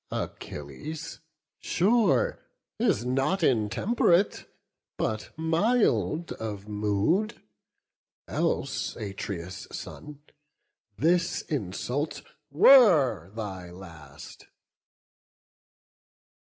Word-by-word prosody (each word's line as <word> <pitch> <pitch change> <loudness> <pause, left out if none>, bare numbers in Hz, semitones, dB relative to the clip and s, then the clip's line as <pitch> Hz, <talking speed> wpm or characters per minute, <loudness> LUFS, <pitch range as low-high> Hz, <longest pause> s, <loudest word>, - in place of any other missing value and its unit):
Achilles, 150 - -6 0.4
sure, 235 - +2 0.4
Is 200 - +1
not 135 +9 0
intemperate, 170 - +2 0.5
but 110 0 -2
mild 160 - +1
of 105 -2 -6
mood; 105 - 0 0.9
Else, - - -1
Atreus' 95 -3 -6
son, 145 -1 -9 0.7
this 170 +7 +1
insult 135 - -3 0.3
were 150 - +6
thy 95 -5 -6
last." 80 -6 -12
135 Hz, 60 wpm, -27 LUFS, -, 0.9 s, were